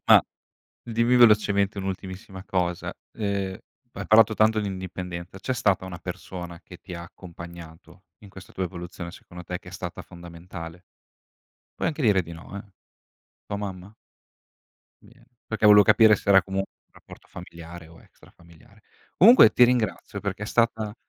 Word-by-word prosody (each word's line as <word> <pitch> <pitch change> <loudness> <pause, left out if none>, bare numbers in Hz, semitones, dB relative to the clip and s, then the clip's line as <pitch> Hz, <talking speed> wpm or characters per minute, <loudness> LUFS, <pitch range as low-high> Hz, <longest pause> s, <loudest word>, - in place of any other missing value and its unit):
Ah. - - +8 0.6
Dimmi 115 +1 +1
velocemente 105 -3 +4
un'ultimissima 95 0 -6
cosa. 90 -3 -2 0.3
Ehm, 100 -3 -2 0.3
hai - - -7
parlato 110 0 +5
tanto 110 0 +3
di 105 - -3
indipendenza, 90 -1 -7
c'è 130 - -3
stata 100 -7 +1
una 90 -2 -8
persona 90 -1 -8
che - - -13
ti 90 - -10
ha 85 - -7
accompagnato 85 0 -12 0.2
in 100 - -13
questa 95 -1 -14
tua 95 - -3
evoluzione 90 -1 -7
secondo 90 0 -12
te 90 0 -5
che - - -15
è - - -16
stata - - -7
fondamentale? 85 0 -11 0.9
Puoi - - -3
anche 155 -1 -4
dire 105 -6 +3
di 85 0 -11
no 85 +4 -10
eh. 100 0 -10 0.7
Tua 100 - -4
mamma? 100 0 -7 1.1
Bene, 120 +3 -21 0.2
perché 110 -1 +1
volevo 105 -1 +8
capire 110 +2 +6
se - - -9
era 95 -2 +7
comunque 95 +1 -4
un - - -49
rapporto - - -15
familiare 85 0 -11
o 85 0 -17
extra - - -21
familiare. 85 -2 -21 0.3
Comunque 230 +8 +8
ti 125 - +6
ringrazio 120 -4 -1
perché 100 +1 -4
è - - -7
stata 110 -2 0
95 Hz, 160 wpm, -25 LUFS, 85-105 Hz, 1.1 s, Ah